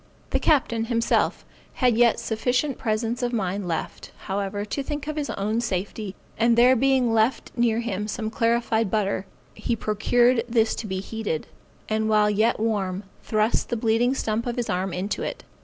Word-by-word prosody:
The - - +2
captain, 235 -7 +2
himself, 230 0 +1 0.3
had 250 -3 +2
yet 235 0 +4
sufficient 250 +5 -1
presence 225 +2 -1
of 245 -1 0
mind 195 -4 -2
left, 165 -2 -4
however, 200 +1 -2
to 280 - -3
think 290 +1 -4
of 305 0 -4
his 295 -2 -2
own 215 +4 -1
safety, 200 -1 -3 0.2
and 230 0 +4
there 250 +2 +6
being 260 -2 +2 0.4
near 235 -1 +2
him 210 -3 -3
some 220 0 -3
clarified 230 -1 +1
butter, 200 -2 -1 0.3
he 235 - -2
procured 230 +3 +2
this 225 -1 +2
to 220 - -4
be 190 -1 -3
heated, 210 -7 -3 0.4
and 220 0 0
while 210 -1 +4
yet 215 +3 +2
warm, 200 -4 -1 0.2
thrust 215 0 0
the 240 - -1
bleeding 230 +3 +2
stump 225 -1 -1
of 240 - -2
his 240 -2 -2
arm 185 +1 -1
into 185 +4 -3
it. - - -4
225 Hz, 170 wpm, -25 LUFS, 210-240 Hz, 0.4 s, there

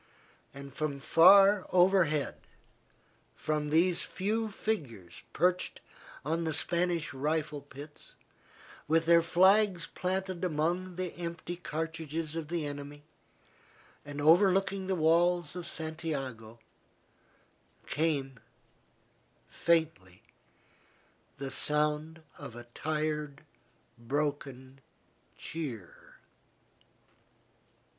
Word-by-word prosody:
And 140 -1 -10
from 145 -1 -3
far 195 +6 +6
overhead, 180 -5 +3 1.0
from 150 -1 -2
these 170 +3 +3
few 220 +3 -2
figures 125 - -4
perched 180 +1 0 0.5
on 165 +3 -1
the 160 -2 -1
Spanish 170 -2 0
rifle 150 +1 -2
pits, 145 +2 -13 0.7
with 165 +2 +2
their 170 0 +6
flags 185 +1 +4
planted 185 -1 -3
among 175 +2 -1
the 180 -1 -4
empty 170 0 -5
cartridges 160 -2 -4
of 165 -2 -4
the 165 -1 -2
enemy, 145 0 -7 1.0
and 145 0 -7
overlooking 190 +4 +3
the 190 - 0
walls 170 0 +2
of 180 -1 -6
Santiago, 135 -8 -5 1.3
came, 140 -5 -1 1.1
faintly, 160 - 0 1.1
the 135 0 -5
sound 150 +3 -1 0.2
of 140 -5 -9
a 120 - -8
tired, 150 -1 -3 0.5
broken 135 0 -3 0.6
cheer. 130 - -7
160 Hz, 85 wpm, -30 LUFS, 145-175 Hz, 1.3 s, far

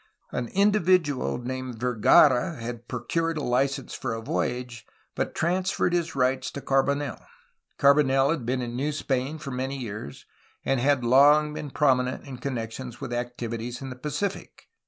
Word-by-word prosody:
An 125 -1 -2
individual 185 - +2
named 130 0 -5
Vergara 125 +5 +4
had 120 -1 -7
procured 165 +7 -2
a 150 - -3
license 135 +2 0
for 120 -3 -3
a 115 - -5
voyage, 120 -1 -3 0.3
but - - -3
transferred 180 +1 0
his 170 -3 -1
rights 130 0 +1
to - - -5
Carbonel. 140 0 0 0.5
Carbonel 140 -1 +4
had 160 -6 -2
been 125 +2 -1
in 120 0 -5
New 145 +4 -1
Spain 135 +1 -2
for 140 -3 -7
many 130 +2 -3
years, 105 - -7 0.4
and 135 -1 +1
had 135 0 +2
long 145 +4 +5
been 150 -1 -5
prominent 130 -2 +1
in 135 -3 -8
connection 125 -1 -4
with 120 - -5
activities 120 0 -4
in 135 -1 -6
the - - -7
Pacific. 150 +9 -4
130 Hz, 155 wpm, -26 LUFS, 125-145 Hz, 0.5 s, long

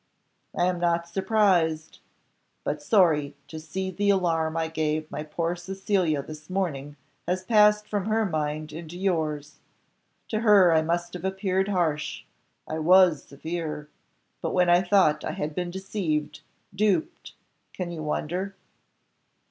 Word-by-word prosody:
"I 175 - +3
am 180 -1 0
not 170 -1 +1
surprised, 185 -4 +1 0.6
but 150 0 -2
sorry 150 -6 +3
to 160 - -8
see 190 +4 -4
that 175 - -18
the 205 0 +2
alarm 165 -4 +1
I 165 0 0
gave 155 -1 -2
my - - -4
poor 165 +3 -2
Cecilia 180 -4 -1
this 155 +2 -11
morning 150 -7 -2 0.3
has 185 +1 -1
passed 210 0 +4
from 205 -3 -2
her 220 0 +2
mind 155 -3 -3
into 165 +2 -8
yours. 155 -6 -2 0.7
To 215 - -1
her 205 -6 +6
I 160 -1 +4
must 170 +2 -2
have 180 -1 -7
appeared 190 0 0
harsh: 165 -7 -1 0.4
I 160 - -3
was 180 -1 +5
severe; 155 0 -5 0.5
but - - -2
when 180 -1 +4
I 175 +1 +6
thought 180 -5 +3
I - - -3
had 150 +1 -3
been 180 +2 -3
deceived, 175 -6 -3 0.3
duped, 215 - 0 0.4
can 180 -2 -5
you 165 -2 -6
wonder?" 180 +6 -3
175 Hz, 145 wpm, -26 LUFS, 155-190 Hz, 0.7 s, her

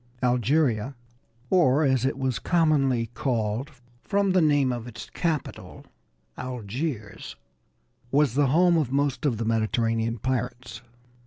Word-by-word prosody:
Algeria, 125 0 +1 0.6
or, 155 -5 +4
as 130 -3 +2
it 135 - -1
was 130 -3 -1
commonly 135 -9 +1
called 120 0 -2 0.3
from 200 -1 +1
the 185 -1 +3
name 145 -4 +3
of 120 -1 -5
its 115 -2 -9
capital, 160 -5 -4 0.5
Algiers, 125 -1 -5 0.7
was 140 -2 +2
the 140 +1 +3
home 170 +5 +4
of 135 -5 -2
most 140 +1 0
of 120 -6 0
the 115 - -3
Mediterranean 115 +1 0
pirates. 125 -1 -4
130 Hz, 125 wpm, -25 LUFS, 115-145 Hz, 0.7 s, or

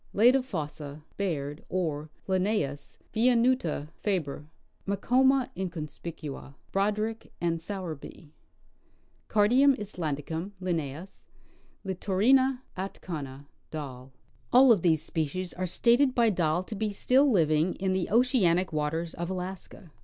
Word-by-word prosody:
Leda 245 +6 +5
fossa, 150 - -6
Baird, 150 -6 -3
or 155 -4 -2 0.2
L. 190 - 0
viinuta, 215 - 0
Fabr.; 155 -7 -2 0.4
Macoma 255 +6 +3
inconspicua, 155 -5 -6 0.2
B. 210 +3 -1
and 165 -1 0
S.; 160 - -12 1.6
Cardium 250 +7 +5
islandicum, 165 -2 -4
L.; 165 -2 -3 0.9
Litorina 250 +8 +3
atkana, 150 -7 -6 0.2
Dall. 135 -4 -7 0.4
All 255 +1 +7
of 210 -6 +4
these 160 -3 +2
species 165 +3 -3
are 185 +1 -3
stated 245 +8 +3
by 235 -2 +4
Dall 175 -1 +1
to 200 - -8
be 215 0 -1
still 260 +7 +3
living 160 - +2
in 190 0 -1
the 185 -2 -1
oceanic 200 - +3
waters 160 +2 -1
of 170 +1 -4
Alaska. 185 -1 -6
185 Hz, 110 wpm, -28 LUFS, 155-220 Hz, 1.6 s, All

